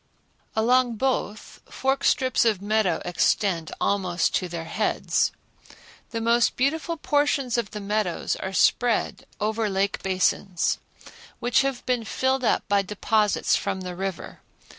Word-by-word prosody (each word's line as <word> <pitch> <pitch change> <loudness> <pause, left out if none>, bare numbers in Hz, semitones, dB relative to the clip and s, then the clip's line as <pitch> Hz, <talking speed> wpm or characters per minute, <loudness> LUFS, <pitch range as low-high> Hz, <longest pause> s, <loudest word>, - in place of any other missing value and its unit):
Along 240 +2 +3
both 220 -3 -2
forks 270 +1 +1
strips 260 -1 +2
of 220 -5 +2
meadow 205 -4 0
extend 175 -1 +1
almost 185 -3 0
to 185 - 0
their 170 -1 -5
heads. 210 +6 0 0.8
The 230 - -3
most 235 +1 +2
beautiful 320 +5 0
portions 290 -4 +1
of 235 -4 -1
the 210 - -6
meadows 205 -3 -1
are 190 - -5
spread 235 +4 +1
over 215 +1 0
lake 195 +1 -1
basins, 185 -1 0 0.6
which 240 -1 +3
have 270 -2 -3
been 250 -2 0
filled 260 +4 0
up - - +1
by 200 -1 +3
deposits 210 +1 +1
from 190 - -2
the 180 -1 -6
river. 190 -1 -5
215 Hz, 135 wpm, -25 LUFS, 195-245 Hz, 0.8 s, Along